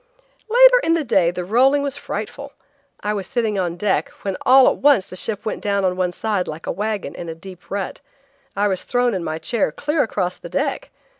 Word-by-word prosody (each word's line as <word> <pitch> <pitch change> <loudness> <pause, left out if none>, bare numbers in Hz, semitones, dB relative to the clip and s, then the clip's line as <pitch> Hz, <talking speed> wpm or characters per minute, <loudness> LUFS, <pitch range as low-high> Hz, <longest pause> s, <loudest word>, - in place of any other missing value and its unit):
Later - - +7
in 330 - +3
the 325 - 0
day 180 -10 +3
the 180 0 -4
rolling 265 +8 +3
was 280 -1 -2
frightful. 280 +4 -6 0.5
I 210 - -1
was 200 -3 -4
sitting 225 -6 -1
on 175 -2 -2
deck 195 +1 0
when 195 -2 -2
all 260 0 +7
at - - +2
once 275 -9 +4
the - - -11
ship 205 +2 -4
went 215 - -3
down 200 -1 0
at 180 -1 +1
one 180 -1 0
side 200 0 -2
like 155 +2 -7
a - - -2
wagon 210 +1 -3
in 170 - -7
a 165 - -5
deep 180 +1 -13
rut. 195 +4 -4 0.5
I 205 +1 +2
was 190 -2 -1
thrown 245 -1 +1
in 185 -3 -2
my 155 -1 -3
chair 180 +2 -1
clear 295 - -1
across 185 -5 -2
the - - -10
deck. - - -2
205 Hz, 220 wpm, -21 LUFS, 185-255 Hz, 0.5 s, Later